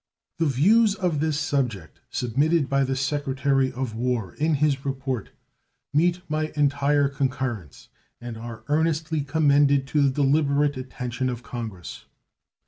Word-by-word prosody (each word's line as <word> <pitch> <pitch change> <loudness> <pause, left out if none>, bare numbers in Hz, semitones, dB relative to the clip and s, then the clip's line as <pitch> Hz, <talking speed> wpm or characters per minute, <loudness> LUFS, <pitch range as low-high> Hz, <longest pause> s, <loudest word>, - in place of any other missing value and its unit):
The 165 - +2
views 200 - +4
of 180 -7 -1
this 155 -1 0
subject 120 - -2
submitted 145 +5 +1
by 140 0 +2
the 135 0 -1
Secretary 135 -1 0
of 130 -3 -4
War 115 -5 -2
in 155 +1 +1
his 140 -2 +1
report 135 -4 -3 0.6
meet 175 +4 +2
my 155 0 -2
entire 145 0 +2
concurrence, 130 - -3 0.3
and 120 -1 -7
are 115 0 -8
earnestly 160 +1 0
commended 140 -1 +3
to 150 - +2
the 140 - +4
deliberate 145 +1 +2
attention 130 -1 -4
of 120 -1 -5
Congress. 110 -8 -7
140 Hz, 135 wpm, -24 LUFS, 130-150 Hz, 0.6 s, views